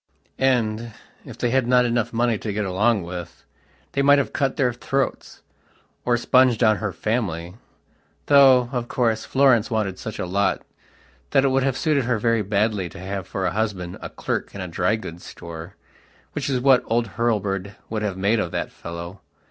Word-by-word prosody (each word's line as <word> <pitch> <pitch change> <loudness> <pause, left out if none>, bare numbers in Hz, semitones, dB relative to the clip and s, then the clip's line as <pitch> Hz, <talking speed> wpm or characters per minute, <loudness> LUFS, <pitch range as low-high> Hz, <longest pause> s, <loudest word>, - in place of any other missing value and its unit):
And, 115 -3 +1 0.3
if - - -10
they 120 - 0
had 130 -1 +2
not 125 0 +4
enough 120 -2 0
money 115 -2 +1
to 110 - -4
get 105 +1 -2
along 100 +2 +1
with, 90 0 -8 0.5
they 140 - 0
might 145 +1 +6
have 140 - -1
cut 135 -2 0
their 125 -3 +2
throats, 135 +3 -3 0.6
or 120 -1 +3
sponged 125 -1 +3
on 110 -2 +4
her 105 -2 -3
family, 90 -7 -2 0.7
though, 135 -3 +6
of 120 -3 -2
course, 115 -3 0
Florence 130 -4 +3
wanted 105 -5 -1
such 110 - -6
a - - -3
lot 100 +2 0 0.7
that 135 - +3
it - - +4
would 135 +1 +2
have 135 -1 0
suited 150 -5 +1
her 120 -1 +1
very 115 +1 +1
badly 100 -2 0
to - - -12
have 95 0 -5
for 95 -1 -3
a - - +1
husband 100 -5 -3
a - - -6
clerk - - -4
in 100 - -5
a 90 - -4
dry 90 +5 +1
goods 90 -6 -8
store, 85 +2 -9 0.6
which 145 0 -3
was 130 -2 +1
what 135 -1 +5
old 115 +1 0
Hurlbird 100 -4 -1 0.2
would 110 -1 -2
have 100 -3 -2
made 100 +4 +2
of 90 - -1
that - - -3
fellow. 85 +3 -8
110 Hz, 190 wpm, -23 LUFS, 100-125 Hz, 0.7 s, might